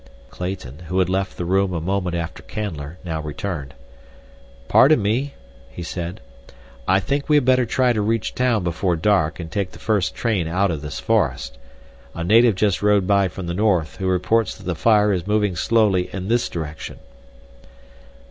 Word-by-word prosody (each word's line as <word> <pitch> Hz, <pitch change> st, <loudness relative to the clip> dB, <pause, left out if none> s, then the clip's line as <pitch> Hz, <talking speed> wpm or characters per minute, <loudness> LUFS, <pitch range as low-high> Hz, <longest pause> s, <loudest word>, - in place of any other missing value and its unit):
Clayton, 90 Hz, -7 st, -6 dB
who 90 Hz, -, -2 dB
had 90 Hz, -1 st, +2 dB
left 95 Hz, 0 st, -1 dB
the 90 Hz, -, -3 dB
room 95 Hz, +1 st, +1 dB
a 85 Hz, -, -1 dB
moment 90 Hz, +1 st, -1 dB
after 85 Hz, -1 st, -4 dB
Canler, 80 Hz, -8 st, -5 dB
now 80 Hz, -3 st, -3 dB
returned. 75 Hz, -2 st, -5 dB, 0.9 s
"Pardon 145 Hz, +2 st, +6 dB
me," 120 Hz, +7 st, -1 dB, 0.3 s
he -, -, -8 dB
said. 85 Hz, +1 st, -5 dB, 0.7 s
"I 95 Hz, +1 st, +4 dB
think 140 Hz, +10 st, -2 dB
we 150 Hz, -, +5 dB
had 145 Hz, -4 st, +4 dB
better 130 Hz, -2 st, +3 dB
try 125 Hz, +1 st, +2 dB
to 110 Hz, -, 0 dB
reach 110 Hz, +1 st, -1 dB
town 125 Hz, -5 st, +1 dB
before 85 Hz, +1 st, 0 dB
dark 85 Hz, -2 st, +1 dB
and 80 Hz, -1 st, -7 dB
take 95 Hz, 0 st, -2 dB
the -, -, -11 dB
first 105 Hz, -4 st, 0 dB
train 105 Hz, -8 st, 0 dB
out 95 Hz, +3 st, +1 dB
of 80 Hz, -3 st, -4 dB
this 75 Hz, -1 st, -6 dB
forest. 70 Hz, -, 0 dB, 0.6 s
A 85 Hz, -, -3 dB
native 115 Hz, +4 st, +5 dB
just 100 Hz, -1 st, +1 dB
rode 105 Hz, -2 st, +3 dB
by 100 Hz, 0 st, +3 dB
from 90 Hz, +1 st, -7 dB
the 85 Hz, -, -3 dB
north, 95 Hz, -4 st, +1 dB
who 95 Hz, -1 st, -2 dB
reports 95 Hz, +4 st, +1 dB
that -, -, -14 dB
the 90 Hz, -, -2 dB
fire 105 Hz, +4 st, +3 dB
is 90 Hz, 0 st, -3 dB
moving 105 Hz, -3 st, +1 dB
slowly 100 Hz, 0 st, +2 dB
in 95 Hz, +1 st, -5 dB
this 120 Hz, +1 st, +1 dB
direction." 80 Hz, -2 st, -6 dB
95 Hz, 180 wpm, -21 LUFS, 85-105 Hz, 0.9 s, Pardon